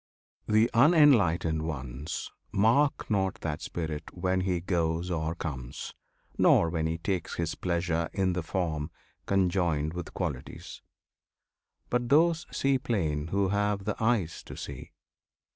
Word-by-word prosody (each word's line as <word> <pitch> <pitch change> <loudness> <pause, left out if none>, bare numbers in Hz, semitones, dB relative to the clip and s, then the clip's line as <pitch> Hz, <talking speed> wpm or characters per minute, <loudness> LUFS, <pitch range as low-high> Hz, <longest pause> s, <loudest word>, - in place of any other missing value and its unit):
The 110 +2 +4
unenlightened 115 - +5
ones 70 -2 -5 0.2
Mark 120 +8 +3
not 95 -1 +1
that 75 -1 -3
Spirit 80 -2 -5
when 95 +1 0
he 90 -2 0
goes 85 0 -1
or 80 -1 -1
comes, 70 -6 -6 0.5
Nor 80 - +5
when 80 -2 0
he 80 0 -2
takes 90 +1 -2
his 85 -1 -2
pleasure 85 -2 -1
in 95 -2 +1
the 90 - -1
form, 80 -3 -2 0.4
Conjoined 85 -5 +1
with 90 -1 -7
qualities; - - -5 1.1
but 120 -1 0
those 165 +3 +4
see 135 -1 +1
plain 80 - -1
Who 95 +2 +1
have 100 0 0
the 105 - -1
eyes 110 -8 +1
to - - -9
see. - - -7
90 Hz, 130 wpm, -29 LUFS, 80-105 Hz, 1.1 s, unenlightened